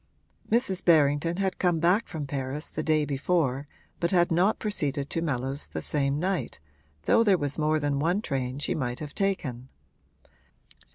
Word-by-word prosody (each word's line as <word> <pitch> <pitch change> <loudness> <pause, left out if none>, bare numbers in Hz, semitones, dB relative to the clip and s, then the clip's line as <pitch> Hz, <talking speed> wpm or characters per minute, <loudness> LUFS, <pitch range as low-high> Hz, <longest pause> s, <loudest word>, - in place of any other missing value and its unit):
Mrs. 205 -6 +1
Berrington 155 +1 +3
had 190 -1 -1
come 175 -2 +2
back 180 +7 +2
from 155 -4 -5
Paris 135 +1 -4
the 155 - -3
day 155 -1 +2
before 140 -1 0 0.3
but 170 - +1
had 175 -2 +3
not 185 +6 +3
proceeded 145 -9 -2
to 165 - -1
Mellows 135 -2 -2
the - - -5
same 140 -1 0
night, 185 - -2 0.4
though 230 - +4
there 200 -4 +4
was 145 -1 -2
more 155 0 +2
than 145 -1 0
one 170 +6 +1
train 130 -1 -2
she 145 - -1
might 125 -4 -2
have 150 -2 -7
taken. 135 -11 -2
155 Hz, 165 wpm, -27 LUFS, 140-180 Hz, 0.4 s, though